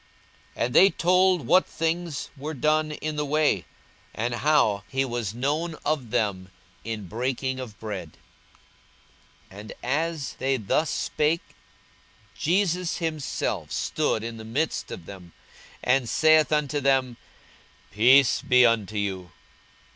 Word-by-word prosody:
42:024:035 - - +1
And 125 - -4
they 195 - +7
told 180 -4 +2
what 180 +9 +4
things 165 -2 -3
were 150 +3 -5
done 155 +3 +1
in 150 0 -4
the 150 - -1
way, 150 +1 +1 0.5
and 120 +2 -2
how 120 -7 +2
he 135 0 -1
was 120 -4 -4
known 150 +6 -1
of 145 -6 -1
them 100 -4 -1 0.3
in 110 -4 -5
breaking 130 +4 -2
of 115 -6 -8
bread. 95 -8 -6 1.4
42:024:036 100 - -11
And 105 +1 -9
as 150 +2 -2
they 135 0 +1
thus 125 +8 0
spake, 155 +3 -1 0.8
Jesus 180 0 0
himself 160 -4 -3
stood 110 - -1
in 115 0 -6
the 110 - -9
midst 135 +9 -2
of 85 - -8
them, 90 -3 -11 0.5
and 125 -2 +2
saith 155 -1 +4
unto 150 -1 +1
them, 130 -3 +1 0.7
Peace 125 +5 +5
be 125 0 +5
unto 110 -3 +1
you. 95 -3 -3
135 Hz, 130 wpm, -25 LUFS, 110-155 Hz, 1.4 s, they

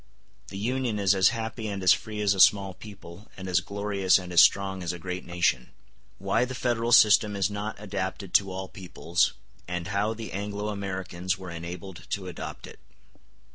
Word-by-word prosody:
The 95 - -8
Union 120 +1 -1
is 100 -1 +3
as 95 -1 +5
happy 110 -1 -4
and 100 -2 -4
as 90 - +7
free 105 -1 -5
as 100 -1 +3
a 95 - -5
small 95 0 +5
people, 100 -1 -12
and 95 0 -7
as 90 0 +3
glorious 100 -1 +1
and 90 -2 -7
as 85 - +8
strong 95 -1 +3
as 85 -1 -2
a 90 - -6
great 90 +1 -6
nation. 85 -7 0 0.5
Why 100 +5 +1
The 130 +1 -4
Federal 120 -2 -1
System 105 -2 +6
Is 100 0 0
Not 105 +1 -5
Adapted 95 -2 -5
To 100 -1 +4
All 95 0 -5
Peoples, 90 -2 -1 0.3
And 90 0 -4
How 105 +2 0
The 115 0 -7
Anglo 105 +1 -4
Americans 95 -2 -3
Were 95 -2 -8
Enabled 85 +2 -8
To 100 -2 -3
Adopt 90 -3 -7
It. - - -13
95 Hz, 185 wpm, -27 LUFS, 90-105 Hz, 0.5 s, as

